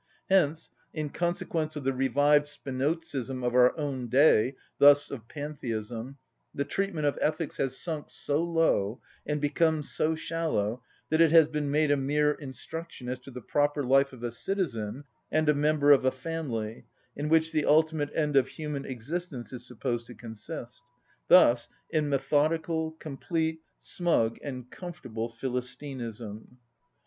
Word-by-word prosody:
Hence, 160 -4 +2 0.2
in 155 -2 -3
consequence 165 -2 -2
of 150 - -5
the 135 +1 +1
revived 145 +3 +3
Spinozism 135 -2 -3
of 120 - 0
our 125 +3 +5
own 135 -5 -3
day, 130 -1 +4 0.2
thus 145 0 +7
of 115 -5 -7
pantheism, 125 -4 -5 0.4
the 140 - -1
treatment 195 -6 -2
of 145 - 0
ethics 155 0 -1
has 135 -1 0
sunk 160 -4 -3
so 145 +3 -1
low 165 -11 +1 0.3
and 150 0 0
become 155 +1 +1
so 155 +2 +1
shallow 155 -9 -1 0.3
that 160 +1 +4
it 165 - +7
has 160 -1 +7
been 150 -2 -2
made 150 +1 +2
a 145 - +4
mere 150 +2 +2
instruction 145 0 -7
as 125 0 -3
to 125 - -13
the 125 -2 -9
proper 145 +2 +1
life 135 +2 +4
of 125 -2 -12
a 120 - -2
citizen 125 - -3 0.3
and 155 0 +2
a 150 - +6
member 145 0 +3
of 140 - +6
a 130 - +4
family, 130 -6 -5 0.3
in 145 +1 -3
which 160 0 +3
the 155 - +1
ultimate 155 -1 +3
end 150 -2 0
of 135 -1 +5
human 150 -3 -5
existence 130 -1 -5
is 125 0 -4
supposed 120 -1 -3
to 120 - -10
consist: 115 +2 -8 0.5
thus 120 -10 +6 0.2
in 155 -2 +1
methodical, 160 +3 +1
complete, 160 +2 -3 0.2
smug, 140 -11 +1
and 125 -3 -6
comfortable 130 -11 -6
philistinism. 125 -2 -5
145 Hz, 150 wpm, -28 LUFS, 125-155 Hz, 0.5 s, thus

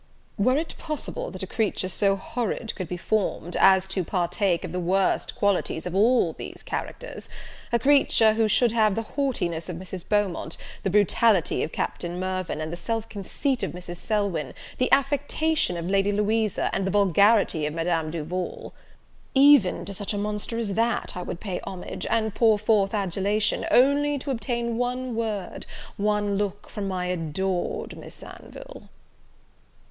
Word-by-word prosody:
Were 255 +6 +3
it 320 +2 -3
possible 330 +11 -4
that - - -7
a - - -1
creature 210 -4 -1
so 195 +1 +2
horrid 225 +3 -3
could 185 -4 -5
be 180 - -4
formed, 180 -2 -1
as 190 0 +5
to 190 -1 0
partake 175 +1 0
of - - -5
the 180 - -2
worst 185 +2 +1
qualities 200 -5 0
of 180 - -4
all 210 -3 +3
these - - -9
characters, - - -6 0.4
a 235 - +4
creature 235 -4 +4
who 220 0 +2
should 235 +2 +3
have 215 -3 +3
the 225 - -1
haughtiness 190 - -2
of 180 - -4
Mrs. 185 0 -7
Beaumont, 205 -4 0 0.2
the - - -1
brutality 205 -1 +3
of - - -2
Captain 175 0 -3
Mirvan, 185 -4 -2
the - - -3
self 225 +5 -3
conceit 240 +6 -2
of - - -2
Mrs. 175 0 -7
Selwyn, 200 - -1 0.2
the 255 - +1
affectation 285 - +2
of 170 0 -4
Lady 195 +1 +2
Louisa, 210 0 +1
and 195 0 0
the - - +1
vulgarity 200 -4 +3
of 150 - -5
Madame 165 -1 0
Duval, 170 +3 -4 0.6
even 275 -8 +6
to 200 - -6
such 205 +1 -3
a - - -2
monster 210 +2 -2
as 220 -4 -1
that 230 +3 0
I 180 - -4
would 175 - -5
pay 190 -4 -4
homage, 185 -2 -6
and 220 -2 +1
pour 225 -3 +4
forth 210 -1 +2
adulation, 200 +2 0
only 285 +3 +4
to 275 +1 -4
obtain 235 -2 -2
one 250 0 -2
word, 220 -4 -3 0.3
one 205 -1 0
look 205 0 -3
from 205 -2 -4
my 185 -1 -2
adored 180 +1 -2
Miss - - -9
Anville!" - - -11
205 Hz, 165 wpm, -25 LUFS, 180-230 Hz, 0.6 s, even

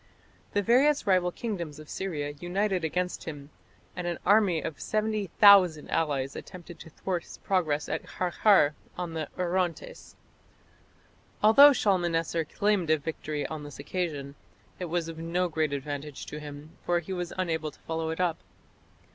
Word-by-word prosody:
The 205 - +1
various 275 +7 +4
rival 185 -2 +3
kingdoms 175 -9 -5
of 155 0 -11
Syria 150 -7 -3
united 185 +1 -1
against 180 +3 -2
him, 145 -2 -8 0.4
and 180 -1 -4
an 170 -1 -2
army 200 -4 +4
of 155 - -6
70,000 200 -5 +4
allies 140 -4 0
attempted 175 -2 -10
to - - -11
thwart 180 +2 -3
his - - -12
progress 155 -6 0
at - - -4
Qarqar 180 -3 +3 0.2
on 175 -2 -4
the 160 -2 -3
Orontes. 180 - -2 1.3
Although 280 +7 +9
Shalmaneser 170 -6 +1
claimed 200 0 0
a 155 - +5
victory 150 -1 -4
on 155 -2 -5
this 145 -1 -9
occasion, 145 -3 -4 0.5
it 180 - -3
was 170 -1 -2
of 165 -1 -7
no 175 +2 0
great 155 -2 -1
advantage 145 0 -5
to 150 - -7
him, 150 +1 -10
for 175 - +1
he 175 +3 -6
was 175 -1 -4
unable 160 -4 -1
to 150 - -19
follow 160 0 -3
it 160 - -4
up. 175 -3 +1
170 Hz, 155 wpm, -28 LUFS, 155-185 Hz, 1.3 s, Although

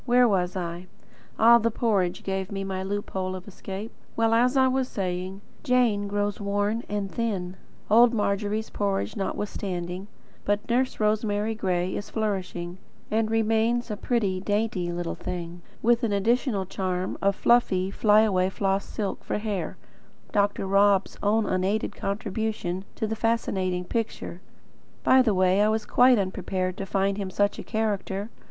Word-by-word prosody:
Where 245 0 +5
was 185 -3 +1
I? 175 0 -4 0.5
Ah, 235 +2 +7
the 230 +1 +1
porridge 205 -6 0
gave 190 0 -3
me 195 -1 -3
my 190 -1 -3
loophole 190 -1 -3
of 185 +1 -9
escape. 200 +2 -7 0.2
Well, 225 0 +2
as 250 +3 +3
I 260 0 +5
was 260 0 +1
saying, 185 -2 -3 0.2
Jane 245 -7 +2
grows 205 0 -1
worn 205 +3 0
and 205 -2 -2
thin, 195 -6 -2 0.3
old 235 +3 +6
Margery's 210 0 -1
porridge 200 -1 -1
notwithstanding; 190 -2 -3 0.4
but 205 +1 -1
Nurse 250 +2 0
Rosemary 215 0 +1
Gray 185 -3 -1
is 205 - -5
flourishing, 190 -5 -3 0.3
and 220 0 +1
remains 225 +2 +1
a - - -1
pretty, 205 -4 0
dainty 205 -4 -1
little 175 -1 -3
thing, 175 -1 -6 0.2
with 235 +1 +4
the 230 -4 0
additional 220 0 +1
charm 185 0 -2
of 200 0 +2
fluffy, 195 -6 +3
fly 210 +1 +5
away 190 -4 +2
floss 195 0 0
silk, 205 -3 -4
for - - -2
hair, 205 -6 -3 0.5
Dr. 205 -1 +1
Rob's 200 0 +3
own 210 +2 +2
unaided 195 +3 0
contribution 200 -2 -3
to - - -2
the 220 +1 -2
fascinating 190 -5 0
picture. 220 -4 -3 0.6
By 260 - +6
the 220 -6 +2
way, 185 +1 +3
I 210 - +4
was 220 0 0
quite 250 0 +5
unprepared 185 -1 -2
to 195 - -4
find 195 +1 0
him 195 -2 -3
such 205 +2 0
a - - -5
character. 210 -1 -2
205 Hz, 155 wpm, -26 LUFS, 190-220 Hz, 0.6 s, Ah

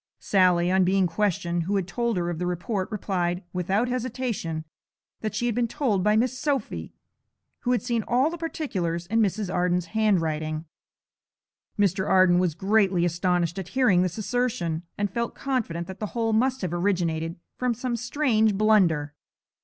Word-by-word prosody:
Sally, 180 -2 +3
on 190 0 +4
being 190 +1 +3
questioned 175 -2 0
who 200 +3 0
had 190 -3 0
told 235 +3 -1
her 175 0 -1
of 165 - -5
the 180 - -1
report 185 +2 -2
replied, 180 -3 -1
without 190 +6 0
hesitation, 245 -10 -3 0.5
that 215 -2 -4
she 240 - -1
had 240 - +1
been 235 +1 +1
told 220 -6 0
by 210 +1 +3
Miss 250 +3 +1
Sophy, 255 - -2 0.7
who 245 - -1
had 245 - +1
seen 235 -3 0
all 260 +6 +2
the 345 - -5
particulars 185 - -3
in 225 +5 0
Mrs. 205 -2 0
Arden's 180 0 +1
handwriting. 160 -7 0 1.1
Mr. 190 -1 +1
Arden 185 -2 +5
was 180 -4 +1
greatly 195 -2 +2
astonished 175 0 0
at 185 - -6
hearing 205 -9 +4
this 180 +1 -1
assertion, 215 -8 -1 0.2
and 205 -2 -1
felt 235 +1 -2
confident 220 -11 -2
that 190 +2 -9
the 215 - -2
whole 225 -1 +1
must 255 +4 +1
have 175 -2 -2
originated 170 -3 0 0.2
from 250 -2 0
some 245 +1 -2
strange 230 -4 +1
blunder. 185 -9 +3
195 Hz, 165 wpm, -26 LUFS, 175-230 Hz, 1.1 s, Arden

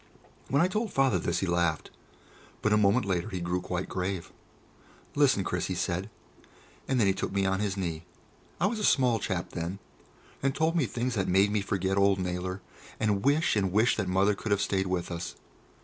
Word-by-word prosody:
When 140 +4 +3
I - - +4
told 210 +2 -2
Father 135 -9 +2
this 85 +1 -1
he - - +1
laughed, 85 -3 0 0.7
but 110 - +3
a - - +6
moment 105 +3 +3
later 90 -3 -1
he 90 - -4
grew 90 +1 -1
quite 90 0 -3
grave. 95 -1 -3 0.8
"Listen, 140 -9 +3
Chris," 90 0 -2
he 95 - -2
said. 90 +2 -2 0.8
And 130 -2 +1
then 110 - +4
he 95 - +3
took - - -3
me 100 0 0
on 95 0 +1
his 100 -2 -1
knee 85 -3 -3 0.5
I - - +2
was 215 +2 0
a - - -3
small 125 - +3
chap 95 -3 -3
then 85 +3 -4 0.6
and 135 0 0
told 160 +2 +1
me 150 -8 +2
things 125 +2 -2
that 95 -4 -1
made 95 +3 +4
me 105 -1 +1
forget 95 0 0
old 100 0 +4
Naylor, 90 +1 -3 0.4
and 105 -2 +1
wish 145 +1 +3
and 95 -3 +1
wish 110 +5 +3
that - - -2
Mother 95 +3 +3
could 105 +2 -6
have 100 - +3
stayed 95 -1 0
with 90 -1 -2
us. 85 0 -5
95 Hz, 205 wpm, -28 LUFS, 90-115 Hz, 0.8 s, a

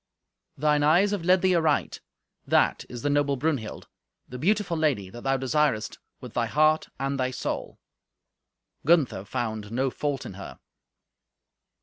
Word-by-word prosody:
"Thine 150 +1 +2
eyes 175 +7 +4
have 200 -5 -2
led 185 +1 +4
thee 185 -1 +4
aright. 160 -4 +1 0.5
That - - +2
is 120 -1 -8
the 145 - +1
noble 145 -1 +2
Brunhild, 135 -5 -3 0.4
the 125 - -8
beautiful 195 +2 +1
lady 135 - 0
that 120 - -9
thou 135 +1 +1
desirest 135 -4 0 0.2
with 125 -3 -10
thy 120 -1 0
heart 155 +5 +2
and 135 0 -2
thy 130 0 +1
soul." 130 - -4 1.1
Gunther 140 - +2
found 110 -1 -4
no 130 +2 0
fault 145 -1 -3
in - - -7
her. 100 +1 -9
140 Hz, 145 wpm, -26 LUFS, 120-155 Hz, 1.1 s, eyes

